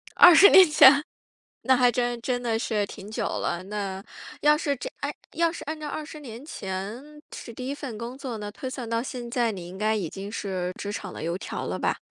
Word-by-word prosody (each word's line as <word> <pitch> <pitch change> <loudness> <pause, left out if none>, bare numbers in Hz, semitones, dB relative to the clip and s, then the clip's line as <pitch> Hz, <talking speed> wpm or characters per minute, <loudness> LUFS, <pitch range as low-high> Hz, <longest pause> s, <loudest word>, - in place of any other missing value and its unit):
20 355 +3 +9
年 375 -2 +9
前， 285 -1 +7 0.6
那 260 - +4
还 250 -1 +4
真 240 0 -1
真 245 0 -1
的 230 -2 -1
是 215 -3 0
挺 200 0 -10
久 220 0 -3
了， 175 - -2
那， 195 -1 -5 0.4
要 300 0 +5
是 290 -2 -1
这 250 - -6
诶， 285 +1 -2 0.2
要 335 +1 +2
是 335 - -8
按 310 +2 -5
照 305 - -5
20 305 +1 -6
年 250 -2 -10
前 195 -2 -5 0.3
是 235 - -9
第 255 +3 -6
1 275 - -2
份 275 -6 -7
工 235 +3 -6
作， 255 -4 -5
那 205 -1 -6
推 260 +5 -6
算 255 -3 -6
到 230 0 0
现 245 -1 -6
在， 235 -1 +1
你 180 -4 -8
应 185 +2 -10
该 215 +2 +1
已 190 -7 -2
经 195 +4 -7
是 185 -4 -3
职 205 - -4
场 195 -3 -6
的 - - -7
油 170 +2 -2
条 205 - -5
了 - - -3
吧？ - - 0
235 Hz, 230 characters per minute, -26 LUFS, 205-275 Hz, 0.6 s, 20